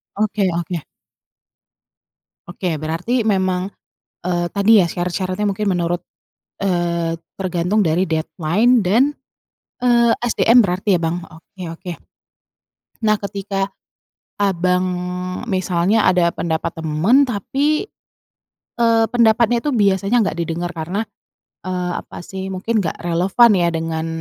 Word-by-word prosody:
Oke 210 -2 0
oke. 170 0 -3 1.7
Oke, 175 -1 -3
berarti 175 +11 -1
memang, 190 -3 0 0.5
eee, 175 -1 0
tadi 210 +2 +5
ya 175 - +3
syarat-syaratnya 185 +3 -2
mungkin 210 +2 -2
menurut 175 -2 0 0.6
eee, 170 -3 0 0.2
tergantung 185 +2 0
dari 170 +1 +2
deadline 170 +8 +1
dan, 205 +8 +4 0.8
eee, 235 -1 +4
SDM 240 0 +4
berarti 190 +1 +1
ya, - - -6
Bang? 165 +2 -1
Oke 170 +4 -15
oke. 165 +2 -7 1.2
Nah, 215 0 +4
ketika 200 -1 -3 0.7
Abang 180 -2 +1 0.6
misalnya 185 +2 +1
ada 180 -2 +4
pendapat 160 0 -2
teman 165 - +3
tapi, 280 - -1 0.9
eee, 230 -1 +4
pendapatnya 235 0 +3
itu 295 - +1
biasanya 200 +1 +2
nggak 200 - -1
didengar 170 +1 -2
karena, 170 +6 -2 0.6
eee, 180 -1 -2
apa - - -11
sih, 190 0 -6
mungkin 205 +4 -1
nggak 165 - -3
relevan 185 +8 +4
ya 175 -2 +2
dengan 165 -1 -3
185 Hz, 115 wpm, -19 LUFS, 175-215 Hz, 1.7 s, tadi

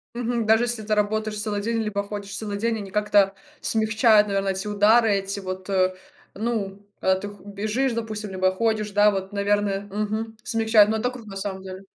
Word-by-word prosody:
Мгм. 240 -1 -1
Даже, 220 +2 +5
если 240 -2 -2
ты 215 0 0
работаешь 215 +1 0
целый 210 -1 -2
день 230 +2 -1
либо 200 -1 -2
ходишь 200 -1 -6
целый 205 -2 -4
день, 225 +2 0
они 200 -2 -7
как-то 205 -1 +3 0.3
смягчают, 220 -1 +3
наверно, 195 -1 0
эти 190 +2 -2
удары, 215 +2 +4
эти 195 0 -2
вот, 185 0 -6
э, 185 -1 +2 0.4
ну, 205 -3 -3 0.2
когда 190 0 +3
ты 205 - -5
х 205 - -12
бежишь, 215 +6 -1
допустим, 215 -3 -4
либо 185 0 +2
ходишь, 215 +1 0
да, 205 +1 +5
вот, 195 0 -4
наверное 200 -1 0
мгм, 215 +2 -3
смягчают, 220 -3 +4
но 220 - +1
это 245 +3 -1
круто, 235 -4 -10
на 195 - -7
самом 195 -1 -4
деле. 190 0 -9
210 Hz, 195 wpm, -24 LUFS, 200-220 Hz, 0.4 s, Даже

